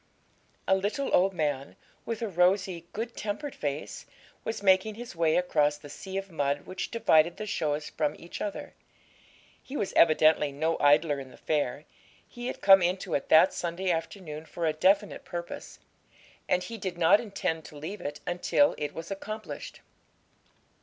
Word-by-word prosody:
A - - +4
little 205 +9 -2
old 190 +2 +4
man, 145 -5 -2 0.3
with 230 0 -3
a - - 0
rosy, 180 -1 +1
good 230 +2 -5
tempered 220 +7 -4
face, 145 0 -5 0.4
was 225 -2 -4
making 190 +2 +4
his 240 -3 -8
way 165 -1 +2
across 150 -5 +2
the 145 -1 -12
sea 190 +5 -6
of 195 -1 -5
mud 145 -2 0
which 185 - -5
divided 170 -7 +3
the 215 - -4
shows 150 -6 -2
from 150 -1 -1
each 170 - -9
other. 205 - -5 0.9
He 275 - -7
was 195 - -2
evidently 155 -2 +5
no 160 +4 -1
idler 145 0 +4
in 135 -1 -8
the - - -15
fair; 145 -2 -1 0.4
he 240 0 -7
had - - -5
come 195 -1 +8
into 180 +2 -1
it 140 - -1
that 160 +4 +7
Sunday 180 +2 -2
afternoon 160 -2 -5
for 170 - -3
a 155 - +2
definite 195 +6 +2
purpose, 175 -1 -7 0.7
and 180 0 +2
he 230 -1 -7
did 185 -3 -4
not 175 +4 +5
intend 190 -7 -3
to 150 - -11
leave 175 +8 -6
it 145 - -5
until 180 +11 +2
it 150 - -4
was 165 +3 -7
accomplished. 215 +2 -6
175 Hz, 165 wpm, -28 LUFS, 155-200 Hz, 0.9 s, come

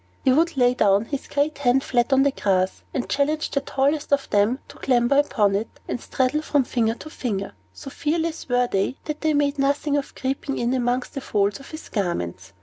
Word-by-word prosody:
He 260 - +4
would 325 +1 +2
lay 245 -1 +4
down 205 -3 +3
his 280 +2 -5
great 285 +1 -1
hand 265 0 +3
flat 245 +1 +1
on 270 0 +5
the 280 - +3
grass, 190 -6 0
and 250 - -2
challenge 300 +3 0
the 280 - 0
tallest 285 +3 0
of 280 -1 +2
them 205 +5 +3
to - - -13
clamber 250 +1 +3
upon 210 -8 +2
it, 210 +3 -1 0.2
and - - -3
straddle 265 +4 0
from 290 -3 +2
finger 230 -2 0
to 310 - -10
finger. 200 -9 -3 0.2
So 275 - -10
fearless 320 0 -2
were 245 0 +3
they, 200 +2 -1
that 300 -1 -4
they 310 -1 +2
made 285 0 +1
nothing 285 +1 +1
of 280 - -4
creeping 270 +1 -3
in 240 +1 0
among 250 0 +1
the 275 - -4
folds 200 -4 0
of 275 - -13
his 310 0 -9
garments. 90 - -3
265 Hz, 210 wpm, -23 LUFS, 230-285 Hz, 0.2 s, on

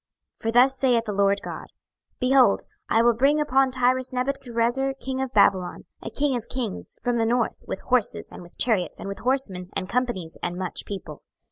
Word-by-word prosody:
26:026:007 - - -30
For 225 - -1
thus 255 +3 +5
saith 245 -4 +3
the 210 - -3
Lord 200 0 +2
GOD; - - -7 0.5
Behold, 255 -4 +4 0.3
I 225 - +4
will 240 0 +5
bring 275 +6 +3
upon 270 -2 +3
Tyrus 255 0 +1
Nebuchadrezzar 255 0 -1
king 265 +1 -3
of 265 -2 -3
Babylon, 185 -7 +2 0.2
a - - -6
king 285 -2 0
of 235 -2 -5
kings, 240 -6 -5
from 245 -1 +1
the 225 - +2
north, 240 0 0
with - - -4
horses, 250 -4 0
and - - -10
with 175 0 -15
chariots, 215 -7 +2
and - - -6
with 195 +1 -6
horsemen, 220 -7 -1
and 185 - -3
companies, 225 -8 -2
and 175 0 -3
much 185 -1 -4
people. 185 -7 -7
240 Hz, 195 wpm, -24 LUFS, 200-260 Hz, 0.5 s, thus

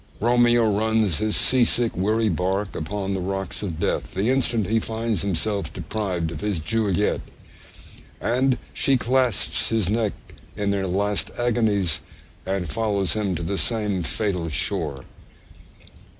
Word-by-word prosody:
Romeo 120 0 +4
runs 110 -4 +1
his 110 0 +1
'sea 130 -1 +4
sick, 120 0 +1
weary 110 +5 +1
bark 95 +2 -1
upon 95 +4 -3
the 95 - -1
rocks' 95 0 -3
of 90 -6 -4
death - - -1
the 100 +6 +1
instant 120 -5 +1
he 115 +4 +2
finds 110 -3 -1
himself 100 +2 -1
deprived 90 -7 -3
of 80 - -6
his 105 -5 -1
Juliet; 105 +3 0 1.0
and 130 +1 +1 0.2
she 135 -1 +3
clasps 125 -2 +2
his 110 -4 +1
neck 110 -2 +1 0.4
in 100 -1 0
their 100 -1 -1
last 100 +3 0
agonies, 105 -9 +1 0.5
and 95 -2 -1
follows 100 +3 +1
him 100 -4 -1
to 85 - -4
the 95 +4 -1
same 105 -5 0
fatal 90 -1 -1
shore. 70 -2 -2
105 Hz, 140 wpm, -24 LUFS, 95-115 Hz, 1.0 s, Romeo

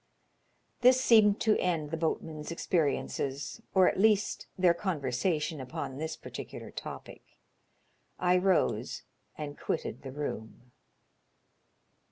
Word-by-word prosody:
This 255 +1 +6
seemed 220 -5 +5
to 220 -2 +3
end 160 -5 -1
the - - 0
boatmen's 160 -1 -3
experiences, 145 -1 -1
or 185 -1 +6
at - - +1
least 210 -1 +2
their 180 -2 +5
conversation 155 -2 -1
upon 130 +1 -5
this 160 +1 -3
particular - - -8
topic. - - -8 1.0
I 180 0 +3
rose 155 - +1 0.3
and 145 -1 -6
quitted 115 - -3
the 135 - -7
room. 125 -4 -6
160 Hz, 110 wpm, -30 LUFS, 140-190 Hz, 1.0 s, This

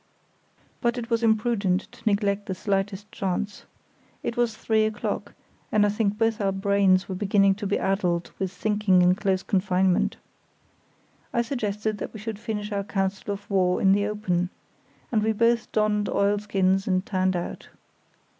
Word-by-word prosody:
But 240 0 +1
it 235 0 -5
was 230 0 +2
imprudent 220 -4 +2
to - - -17
neglect 200 -1 +1
the 190 - -2
slightest 195 +1 -2
chance. 195 +2 -3 0.6
It 235 - -2
was 235 -2 0
three 220 -1 +2
o'clock, 215 -1 -3 0.4
and 210 -1 +4
I - - +3
think 210 0 0
both 225 0 +1
our 195 -1 +2
brains 195 -1 +2
were 190 - -4
beginning 195 0 +3
to 205 - -1
be 205 - +1
addled 180 -3 0
with 190 -2 -1
thinking 200 -1 +2
in 180 +1 +5
close 190 -1 0
confinement. 185 -1 +1 1.1
I 235 - +1
suggested 215 -4 -2
that - - -6
we - - -6
should 215 0 -5
finish 215 -2 -4
our 200 -1 -1
council 195 0 -2
of 200 0 -6
war 185 -2 +2
in 190 - +4
the 205 +1 +2
open, 185 -4 -1 0.6
and 220 -3 +2
we 220 +1 +1
both 235 +2 +2
donned 210 -1 +1
oilskins 200 -1 +1
and 185 -1 +1
turned 185 -1 0
out. 175 - -5
205 Hz, 165 wpm, -25 LUFS, 190-215 Hz, 1.1 s, in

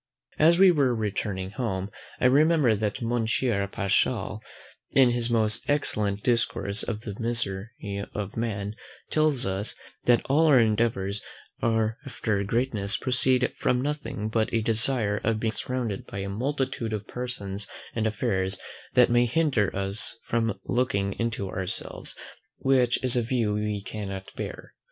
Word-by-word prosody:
As 165 +3 +6
we 190 0 +7
were 135 -7 +2
returning 100 -3 -3
home, 100 -5 -3 0.3
I - - +1
remembered 140 -4 +4
that 110 +3 -2
Monsieur 115 -2 0
Paschal, 105 +2 0 0.5
in 130 -3 +5
his 120 -1 +1
most 110 0 +1
excellent 105 -8 +2
discourse 105 -4 0
on 115 - -3
the 105 - -5
misery 115 -4 0 0.5
of 105 -1 -4
man, 105 -3 -3 0.4
tells 155 -5 +2
us, 95 +3 -1 0.3
that 120 -1 +4
all 155 +4 +3
our 145 -4 +6
endeavours 110 -3 +1 0.4
after 110 -1 -1
greatness 105 -2 0
proceed 130 0 +2
from 125 - +1
nothing 145 -6 -3
but 110 0 0
a 115 -1 +1
desire 115 -2 +1
of 110 0 +1
being 110 0 0
surrounded 120 -6 -3
by - - -7
a 100 0 -3
multitude 125 0 -2
of 105 -1 -3
persons 105 -5 -4 0.3
and 110 -1 0
affairs 95 -3 -1 0.4
that 125 -1 +6
may 120 0 +4
hinder 125 - +2
us 100 +3 +3
from 115 -2 -1
looking 100 -6 0
into 115 -3 -1
ourselves, 95 0 -5 0.4
which 130 -3 +3
is 125 -1 +5
a 120 - +3
view 115 -3 0
we 105 -1 -2
cannot 95 -2 -6
bear. - - -7
115 Hz, 140 wpm, -26 LUFS, 100-125 Hz, 0.5 s, we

